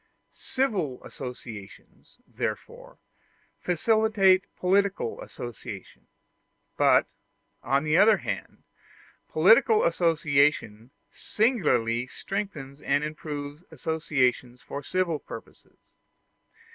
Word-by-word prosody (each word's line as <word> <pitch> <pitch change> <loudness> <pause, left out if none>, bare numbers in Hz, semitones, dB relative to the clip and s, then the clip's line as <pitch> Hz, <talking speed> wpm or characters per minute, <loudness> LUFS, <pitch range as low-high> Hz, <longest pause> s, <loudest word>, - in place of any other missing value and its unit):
Civil 195 - -2
associations, 115 -6 -10
therefore, - - -6 0.6
facilitate 195 +1 +3
political 195 - 0
association: 120 -3 -9 0.7
but, - - +4 0.6
on 140 +1 +1
the 155 0 +1
other 210 +2 +6
hand, - - -6 0.7
political 460 -1 +5
association 145 - +1 0.2
singularly 130 - +1
strengthens 150 -6 -6
and 145 - +1
improves 150 0 -6
associations 135 -5 -1
for 140 - -7
civil 170 0 -1
purposes. 115 - -12
155 Hz, 75 wpm, -27 LUFS, 130-195 Hz, 0.7 s, other